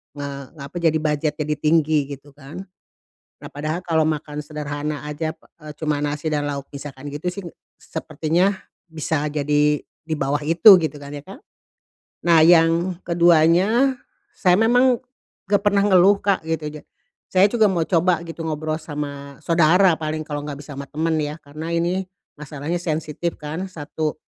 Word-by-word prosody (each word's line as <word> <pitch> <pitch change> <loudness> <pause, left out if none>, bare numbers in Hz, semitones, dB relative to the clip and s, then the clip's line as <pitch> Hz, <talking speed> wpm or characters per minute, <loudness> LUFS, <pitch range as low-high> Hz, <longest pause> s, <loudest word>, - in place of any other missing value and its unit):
eee, 140 -1 -6 0.2
apa, 140 +5 -9
jadi 165 -2 +2
budget 150 -1 0
jadi 150 0 -2
tinggi, 155 -2 +2
gitu 140 +1 -19
kan. 145 +6 -10 0.7
Nah, - - -10
padahal 155 +5 -4
kalau 160 -2 +2
makan 150 -1 -3
sederhana 150 0 -5
saja 150 +2 -4
pe - - -28 0.3
cuman 150 -2 -1
nasi 150 +1 -3
dan 145 -1 -1
lauk 140 -1 -4
misalkan 140 -1 -9
gitu 150 +5 -3
sih, 180 +1 -5 0.3
sepertinya 160 +3 -1 0.4
bisa 155 -2 -2
jadi 150 0 +1
di 160 0 -7
bawah 140 0 -1
itu, 175 +4 +8
gitu 155 -2 -3
kan, 140 +1 -9
ya 145 - -6
kan. 195 - -10 0.9
Nah, 165 -2 +6
yang 170 +1 +4
keduanya, 175 - +3 0.4
saya 180 0 +3
memang 245 +2 +4 0.5
enggak 200 -1 +2
pernah 205 -1 +3
ngeluh, 195 +1 +5
Kak, 200 -1 0
gitu 160 -1 -3
ja - - -24 0.5
saya 190 +2 +6
juga 220 -3 +3
mau 170 -3 0
coba 175 -1 +2
gitu, 165 0 -7
ngobrol 155 0 -2
sama 145 -3 -7
saudara, 170 +2 +4
paling 155 0 -4
kalau 145 -1 -4
enggak 145 -1 -6
bisa 145 - -8
sama 140 - -5
temen 160 +2 -1
ya, 150 +2 -4
karena 155 +3 -7
ini 175 +3 0 0.4
masalahnya 150 +2 -5
sensitif 160 0 -3
kan, 155 +5 -5
satu. 155 -1 -4
155 Hz, 160 wpm, -22 LUFS, 150-175 Hz, 0.9 s, itu